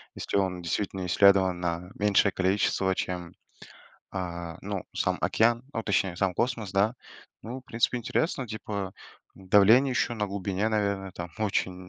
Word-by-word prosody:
Если - - -2
он 95 -2 0
действительно 95 +2 -2
исследован 95 0 +4
на 90 +1 -3
меньшее 100 -1 +3
количество, 95 0 +1
чем, 90 -2 -4 0.8
а, 85 -3 -5
ну 100 -1 -4
сам - - 0
океан, 120 +2 +2
ну 115 - -2
точнее 95 -3 0
сам 95 0 0
космос, 115 -2 -1
да. 100 +4 +2 0.5
Ну, 125 +4 -6
в - - -23
принципе 120 0 0
интересно, 135 +3 -1
типа, 105 -3 -5 0.4
давление 105 +8 +5
еще 120 -1 0
на 105 -2 -1
глубине, 100 +1 -1
наверно, 100 -3 -1
там. 85 0 -7
Очень 95 -3 -1
100 Hz, 145 wpm, -27 LUFS, 90-110 Hz, 0.8 s, давление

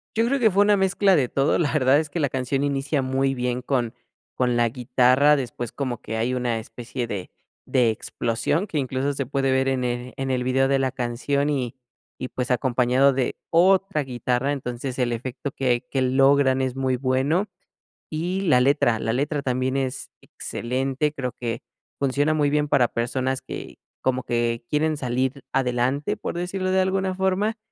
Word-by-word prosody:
Yo 225 +1 +2
creo 275 +2 +1
que 220 -3 +4
fue 195 +2 +3
una 205 0 +4
mezcla 195 0 +3
de 135 -6 +2
todo, 135 +3 +1
la 155 -5 +1
verdad 135 -2 +4
es 155 -1 -4
que 170 - -2
la 145 -3 +1
canción 130 +1 -1
inicia 140 +1 0
muy 135 +1 0
bien 125 -1 -2
con 120 -3 -1 0.4
con 125 -1 +1
la 120 0 +3
guitarra, 130 +4 +3
después 120 -3 -4
como 130 -4 -4
que 110 - -4
hay 120 +3 0
una 120 -2 -1
especie 120 +2 -6
de 100 -5 -5 0.3
de 125 -3 +3
explosión 115 - -1
que 160 - -3
incluso 135 +1 -1
se 135 0 -3
puede 135 +1 0
ver 130 0 +2
en 130 -1 0
el 125 0 -3
en 135 0 -2
el 125 -1 0
video 130 +1 +2
de 135 0 +2
la 130 -1 0
canción 135 +3 -1
y 130 -4 -2 0.4
y, 130 - -3
pues, 125 +1 -3
acompañado 125 +1 +3
de 130 -2 -1
otra 185 -1 +3
guitarra, 125 +1 -1
entonces 130 -1 -4
el 125 -1 +1
efecto 130 +4 -4
que 125 -3 0
que 135 -2 0
logran 135 +1 +4
es 130 -1 -1
muy 130 -1 0
bueno. 135 +9 +1 0.6
Y 175 +5 -2
la 155 -10 +4
letra, 125 -4 +3
la 115 - -1
letra 145 +2 -1
también 130 0 -1
es 135 -1 -3
excelente, 135 +4 -2
creo 130 -3 -3
que 115 -1 -3 0.4
funciona 140 +3 +1
muy 150 -2 +2
bien 150 0 +1
para 135 -4 +3
personas 130 +3 -1
que - - -8 0.2
como 130 -1 0
que 120 -1 -1
quieren 155 +1 +1
salir 130 +1 -2
adelante, 130 +2 0
por - - -5
decirlo 185 +2 -2
de 190 0 +3
alguna 190 0 0
forma. 190 +4 0
130 Hz, 185 wpm, -24 LUFS, 125-145 Hz, 0.6 s, que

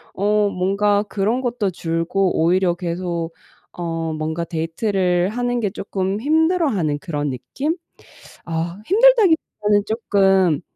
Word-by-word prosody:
어 205 +1 +2
뭔가 200 +2 +1
그런 210 +4 -1
것도 240 -5 -1
줄고 170 +2 -1
오히려 175 +2 +3
계속 170 -1 -3 0.4
어 165 -2 -3
뭔가 160 +2 -3
데이트를 180 +2 0
하는 245 +1 -1
게 210 - 0
쪼끔 195 0 -3
힘들어하는 300 - +1
그런 145 -3 -3
느낌? 275 - -3 0.7
아 170 +3 -3
힘들다기 445 - +5 0.2
보다는 205 -1 +3
쪼끔 195 -7 +2
190 Hz, 250 characters per minute, -20 LUFS, 170-215 Hz, 0.7 s, 힘들다기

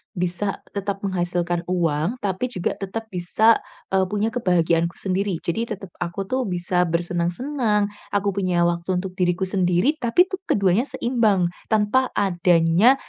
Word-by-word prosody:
bisa 180 +2 -2 0.2
tetap 200 0 -2
menghasilkan 175 -2 -1
uang, 175 +4 0
tapi 195 +4 -1
juga 180 -7 -1
tetap 220 +3 -5
bisa, 195 +5 +3 0.4
eee, 190 0 +3
punya 205 +3 0
kebahagiaanku 170 -6 +1
sendiri. 190 -2 -1
Jadi 195 +7 -1
tetap 195 -2 -12
aku 175 +3 -3
tuh 260 +4 0
bisa 180 0 0
bersenang-senang, 200 - 0 0.3
aku 200 0 +1
punya 180 -3 +1
waktu 175 +2 -1
untuk 190 0 -5
diriku 180 0 +1
sendiri, 185 - +2
tapi 240 +9 +4
tuh 375 0 -5
keduanya 195 +2 +3
seimbang 220 -10 +1 0.2
tanpa 220 +5 +3
adanya, 175 +4 +4
190 Hz, 140 wpm, -23 LUFS, 175-210 Hz, 0.4 s, tapi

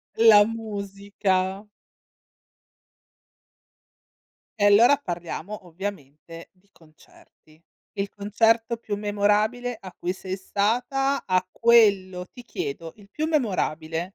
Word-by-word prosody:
La 215 -2 +7
musica. 200 -2 -3 2.9
E 205 - +3
allora 230 +7 +6
parliamo 175 - -6
ovviamente 165 -3 -8
di 190 +2 -34
concerti. 155 0 -23 0.3
Il 200 0 -4
concerto 225 +3 +1
più 210 -3 -5
memorabile 210 +4 0
a 185 -2 -11
cui 180 +1 -3
sei 190 0 -6
stata, 245 +8 -1
a 185 0 +1
quello 200 -6 +3
ti 245 - -11
chiedo, 165 - -6
il 205 -2 -18
più 310 +8 -3
memorabile? 170 - -1
200 Hz, 100 wpm, -24 LUFS, 185-225 Hz, 2.9 s, La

